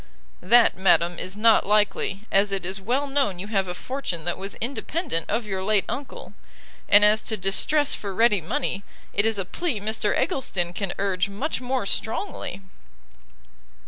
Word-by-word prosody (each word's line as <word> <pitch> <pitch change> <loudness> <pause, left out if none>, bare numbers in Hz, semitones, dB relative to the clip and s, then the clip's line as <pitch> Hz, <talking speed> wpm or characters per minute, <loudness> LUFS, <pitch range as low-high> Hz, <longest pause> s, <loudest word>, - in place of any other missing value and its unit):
"That, 235 +6 +5
madam, 175 -2 +2
is 185 +2 -5
not 225 +1 +5
likely, 205 -1 +1
as 200 +1 +3
it 195 -2 -2
is 190 +2 -3
well 250 +8 0
known 275 -9 0
you 185 - -6
have 195 -3 0
a 180 - -5
fortune 215 - -5
that 175 - -1
was 195 +1 -6
independent 265 - -2
of 225 +2 -1
your 190 -2 -4
late 205 0 +2
uncle; 265 +4 -7 0.6
and 205 +1 +7
as 215 +1 +4
to 220 - -3
distress 275 +10 +2
for 200 - -4
ready 210 -1 +3
money, 200 - -3 0.3
it 205 +2 +2
is 225 -2 +1
a 195 - -2
plea 285 - -3
Mr 210 0 0
Eggleston 175 -9 -1
can 195 0 -3
urge 195 -1 0
much 255 +9 -3
more 255 -3 -2
strongly." 220 - -2
205 Hz, 170 wpm, -24 LUFS, 190-240 Hz, 0.6 s, and